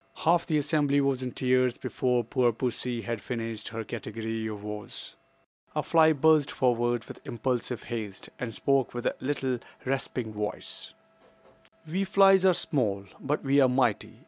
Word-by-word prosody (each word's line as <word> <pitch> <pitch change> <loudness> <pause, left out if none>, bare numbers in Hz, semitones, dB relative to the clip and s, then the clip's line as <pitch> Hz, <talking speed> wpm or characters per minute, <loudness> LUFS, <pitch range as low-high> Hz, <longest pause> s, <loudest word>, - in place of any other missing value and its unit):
Half 170 +1 +2
the 155 - +2
assembly 145 -1 +2
was 140 -2 +1
in 125 -1 -3
tears 130 -1 +2
before 125 -2 0
poor 120 +1 +2
pussy 120 0 -3
had 115 -3 -3
finished 115 -1 -4
her 115 0 -4
category 110 0 -4
of 105 -2 -6
woes. 105 -1 -7 0.6
A - - 0
fly 160 -1 +5
buzzed 155 0 +4
forward 120 -2 +1
with - - -10
impulsive 120 0 -2
haste, 110 -5 -5
and 120 -2 -3
spoke 135 +1 +1
with 120 - -4
a - - +1
little 130 -2 -1 0.3
rasping 125 -4 -2
voice: 105 0 -5 0.9
"We 180 +5 -1
flies 195 -1 +5
are 185 -2 +6
small; 105 -13 -1
but 145 +2 -2
we 140 +1 +3
are 130 - +5
mighty. 125 -4 0
125 Hz, 155 wpm, -28 LUFS, 115-140 Hz, 0.9 s, are